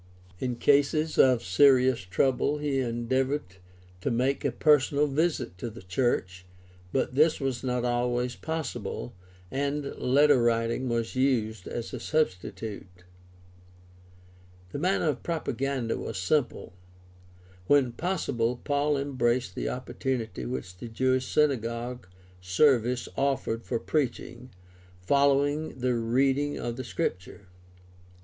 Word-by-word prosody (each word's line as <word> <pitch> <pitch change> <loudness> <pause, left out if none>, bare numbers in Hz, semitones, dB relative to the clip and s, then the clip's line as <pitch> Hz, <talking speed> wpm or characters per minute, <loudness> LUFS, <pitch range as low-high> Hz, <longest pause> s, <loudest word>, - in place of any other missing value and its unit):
In 125 -2 -2
cases 145 +4 +2
of 125 -3 +5
serious 130 +6 +4
trouble 130 +9 +1
he 145 -2 -1
endeavored 125 -2 -1 0.4
to - - -1
make 130 +3 0
a 140 - +1
personal 145 +2 +3
visit 145 - -1
to 120 - -4
the 115 0 -12
church, 90 -2 -1 0.5
but 130 -1 0
this 155 +4 +3
was 135 -3 -2
not 125 -1 -1
always 120 0 0
possible, 135 -8 -4 0.4
and 140 +1 -2
letter 140 +1 +4
writing 115 +2 +1
was 115 0 -2
used 115 -7 0
as 120 -1 -5
a 125 - -4
substitute. 100 -8 -3 1.7
The - - -4
manner 180 +1 +1
of 140 -4 -1
propaganda 135 -6 -2
was 110 - -5
simple. 120 +3 -1 0.9
When 140 -4 +4
possible, 125 -7 -1
Paul 145 0 +1
embraced 130 -6 0
the - - -3
opportunity 125 - -3
which 65 +9 -5
the 105 +6 -8
Jewish 130 +2 0
synagogue 120 -5 0 0.3
service 120 +5 +2
offered 135 -4 -1
for - - -1
preaching, 130 -1 -3 0.5
following 140 +7 +2
the 125 0 0
reading 135 +5 +1
of 120 -1 -4
the 130 - -4
Scripture. 100 - -4
125 Hz, 115 wpm, -28 LUFS, 115-140 Hz, 1.7 s, of